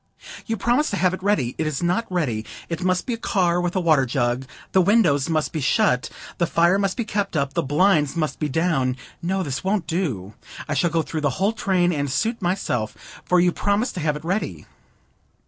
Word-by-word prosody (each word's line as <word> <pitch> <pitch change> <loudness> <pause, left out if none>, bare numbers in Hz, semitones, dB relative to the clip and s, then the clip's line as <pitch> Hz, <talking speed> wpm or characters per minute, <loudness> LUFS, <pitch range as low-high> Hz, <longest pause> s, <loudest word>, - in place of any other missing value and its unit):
"You 225 -1 -1
promised 245 +9 +2
to 200 - -2
have 185 +1 +2
it 185 - -5
ready. 185 - +1
It 160 - 0
is 155 +1 -2
not 180 +7 +1
ready. 130 -12 -1 0.3
It 170 0 -3
must 185 -1 +1
be 250 - -2
a - - -3
car 180 -6 +1
with 175 +1 -2
a - - +2
water 155 -7 +3
jar, 120 0 0 0.3
the 190 - +5
windows 175 -8 +3
must 155 -2 0
be 155 - -2
shut, 140 - +2 0.3
the 170 - +2
fire 170 +4 +3
must 195 -1 0
be 235 - -1
kept 205 -5 -2
up, 140 -1 -1
the - - +1
blinds 150 +1 +2
must 155 -5 -2
be 150 - -1
down. 140 -4 +1 0.2
No, 190 +2 -1
this 140 -4 -4
won't 195 -2 0
do. 125 - -2 0.3
I 155 - -1
shall 160 +5 +2
go 165 -1 0
through 155 0 -4
the 145 - +2
whole 200 +4 +1
train, 180 -5 +1
and 145 -3 -2
suit 225 - -1
myself, 175 - -3
for 180 - +3
you 175 0 +4
promised 205 +7 0
to - - -5
have 150 -2 0
it 150 - -8
ready. 170 - -2
170 Hz, 215 wpm, -23 LUFS, 145-195 Hz, 0.3 s, the